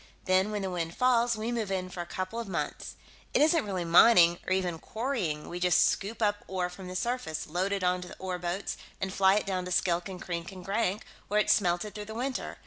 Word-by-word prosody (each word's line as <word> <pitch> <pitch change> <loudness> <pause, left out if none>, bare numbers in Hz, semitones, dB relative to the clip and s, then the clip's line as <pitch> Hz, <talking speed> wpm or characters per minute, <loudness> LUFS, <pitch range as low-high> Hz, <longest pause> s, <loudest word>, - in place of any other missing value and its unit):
Then, 185 +2 +3
when 210 -2 -3
the 190 - -2
winds 170 -2 -3
fall, 245 -2 +3
we 220 +2 -2
move 225 -5 -2
in 185 -1 -1
for 180 -1 -6
a 175 - -7
couple 185 +6 -4
of 230 - -5
months. 190 - -4 0.4
It - - +5
isn't 320 -1 +4
really 185 -3 -2
mining, 175 0 +7
or - - -2
even 180 -3 0
quarrying; 215 - -3
we 175 - -5
just 180 -1 +4
scoop 220 +3 -3
up 205 0 +1
ore 180 -1 -2
from 185 +1 -9
the 185 - -7
surface, 235 -7 -2
load 180 +5 -1
it 200 -1 -1
onto 180 0 0
ore 185 -1 -4
boats, 175 +3 -3 0.2
and 190 0 -3
fly 190 0 +4
it 210 - 0
down 185 -2 -2
to 180 - -6
Skilk 175 +1 +1
and 185 -1 -7
Krink 170 0 -5
and 185 -2 -10
Grank, 200 0 -1 0.2
where 210 +1 +2
it's - - +4
smelted 180 +1 0
through 210 -1 -6
the 220 +1 -8
winter. 255 +2 -3
190 Hz, 230 wpm, -29 LUFS, 180-215 Hz, 0.4 s, mining